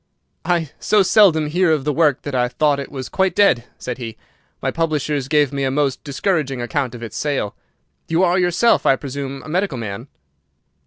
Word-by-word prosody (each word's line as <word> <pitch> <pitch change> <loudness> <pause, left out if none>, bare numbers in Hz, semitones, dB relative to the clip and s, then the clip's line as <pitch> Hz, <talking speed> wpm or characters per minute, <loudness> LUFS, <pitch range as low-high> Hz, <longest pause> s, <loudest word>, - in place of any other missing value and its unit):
"I 165 -4 0
so 210 -2 +3
seldom 180 -5 +4
hear 170 +3 +2
of 150 -3 +1
the 150 +1 0
work 150 -3 +2
that 145 - -5
I 125 -1 +2
thought 140 +3 +1
it 140 - -6
was 130 -2 -6
quite 190 -2 0
dead," 125 -13 +3
said 125 +1 -6
he. 115 -3 -7 0.4
"My - - -1
publishers 150 -4 -1
gave 145 -2 +2
me 140 0 -2
a 135 - +1
most 135 -1 -1
discouraging 140 -2 -1
account 125 +1 -2
of 120 - -9
its 110 -2 -7
sale. 140 -8 -2 0.5
You 165 +3 +2
are 180 +1 +3
yourself, 180 +6 +2
I 135 - +5
presume, 135 0 -6
a - - -11
medical 180 -3 -1
man?" 115 +2 -6
145 Hz, 195 wpm, -20 LUFS, 130-170 Hz, 0.5 s, I